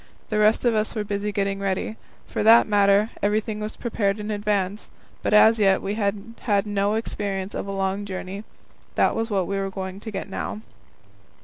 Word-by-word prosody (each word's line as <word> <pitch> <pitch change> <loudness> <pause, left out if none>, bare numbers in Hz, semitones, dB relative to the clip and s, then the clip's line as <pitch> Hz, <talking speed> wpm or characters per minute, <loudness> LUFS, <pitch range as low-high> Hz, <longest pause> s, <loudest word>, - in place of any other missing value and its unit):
The 215 - 0
rest 215 +3 +3
of 240 - +4
us 215 +1 -1
were 215 - -1
busy 205 0 -2
getting 195 -1 -1
ready. 195 +2 -2 0.3
For - - -3
that 225 +2 +7
matter, 205 +1 +4
everything 210 +1 0
was 215 +1 -4
prepared 210 -3 -1
in 210 +1 -4
advance, 205 -1 -1 0.3
but - - -1
as 220 +1 +6
yet 195 -2 +4
we 200 - -3
had 210 +1 -2
had 205 -3 +1
no 205 0 0
experience 200 -3 -3
of - - -4
a - - -3
long 195 +1 -1
journey. 190 +1 -6 0.5
That - - +3
was 225 +1 -1
what 195 -4 +1
we 195 +1 -2
were 195 0 -2
going 190 0 -6
to 220 - -7
get 195 -2 -5
now. 205 +2 -5
205 Hz, 195 wpm, -24 LUFS, 195-215 Hz, 0.5 s, that